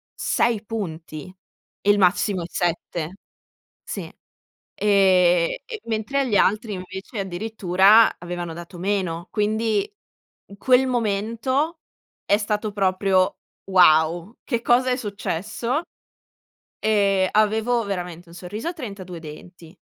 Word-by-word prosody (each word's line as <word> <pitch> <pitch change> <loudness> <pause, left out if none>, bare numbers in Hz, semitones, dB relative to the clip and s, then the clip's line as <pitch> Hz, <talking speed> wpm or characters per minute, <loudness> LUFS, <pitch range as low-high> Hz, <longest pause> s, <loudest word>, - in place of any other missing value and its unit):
6 230 -3 0
punti, 170 -6 -6 0.5
il 205 +1 +4
massimo 185 0 +2
è - - -5
7. 175 0 -3 0.7
Sì. - - -6 0.7
Ehm, 185 -4 +4 0.4
mentre 225 +5 -1
agli 255 -7 0
altri 210 +2 +2
invece 190 +4 -7
addirittura 195 +2 +3
avevano 175 -1 -5
dato 175 +1 -10
meno, 185 -2 -2
quindi 220 - 0 0.7
quel 260 +4 +3
momento 240 - -1 0.5
è 205 - +3
stato 210 0 -2
proprio: 190 -1 +1 0.3
"Wow, 175 +2 +4
che 235 -4 -2
cosa 250 +2 +3
è - - +2
successo?" 220 - -3 1.0
E 200 -3 +2
avevo 220 +3 +2
veramente 180 -3 -5
un 170 - -13
sorriso 195 - -6
a 355 - -4
32 200 - -8
denti. 165 +2 -12
200 Hz, 105 wpm, -23 LUFS, 180-220 Hz, 1.0 s, il